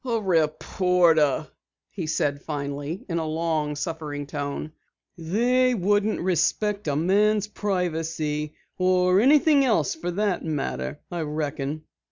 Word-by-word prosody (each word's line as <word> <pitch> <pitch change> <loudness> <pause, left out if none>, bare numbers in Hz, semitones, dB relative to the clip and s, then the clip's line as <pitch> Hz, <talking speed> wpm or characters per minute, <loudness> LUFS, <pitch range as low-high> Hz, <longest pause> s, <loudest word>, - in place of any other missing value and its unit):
"A 235 -3 0
reporter," 165 -3 +2 0.5
he 175 -6 -5
said 145 -2 0
finally 145 +3 -5
in 170 -2 -1
a 160 - -2
long 155 -2 -1
suffering 145 -1 -4
tone. 145 +1 -4 0.4
"They 240 +9 +2
wouldn't 205 +2 +1
respect 190 +3 0
a 145 - 0
man's 205 +6 +2
privacy 165 -7 -2 0.2
or 185 0 +3
anything 290 +2 +5
else 215 - +2
for 170 +2 -5
that 195 0 -1
matter, 105 - -3
I 175 -1 -3
reckon." 150 -1 -3
165 Hz, 120 wpm, -25 LUFS, 150-200 Hz, 0.5 s, anything